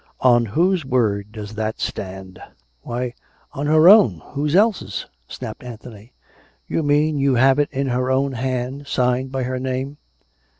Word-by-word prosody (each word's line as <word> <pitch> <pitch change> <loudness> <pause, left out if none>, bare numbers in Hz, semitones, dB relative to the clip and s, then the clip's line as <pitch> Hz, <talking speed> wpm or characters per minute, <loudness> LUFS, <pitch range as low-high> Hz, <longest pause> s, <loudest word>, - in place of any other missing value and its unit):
" - - -42 0.2
On 120 -1 +1
whose 175 - +1
word 105 -6 0
does 105 -1 -8
that 110 0 -3
stand 95 -1 -6
.^ - - -24
" - - -44
" 60 - -44
Why, 120 0 -4 0.4
on 145 +2 -3
her 155 +2 +5
own! 125 - +6
Whose 145 +3 -1
else's? 195 - +1
" - - -43
snapped - - -8
Anthony. 115 -1 -11 0.3
" - - -35
You - - -1
mean, 150 0 +1
you 135 -1 +2
have 135 +3 +4
it 145 - +1
in 135 0 -2
her 125 +1 0
own 135 +1 +1
hand, 130 +2 -3
signed 125 0 0
by 135 -1 -2
her 130 +1 -3
name 130 +2 -3
130 Hz, 185 wpm, -21 LUFS, 110-140 Hz, 0.4 s, own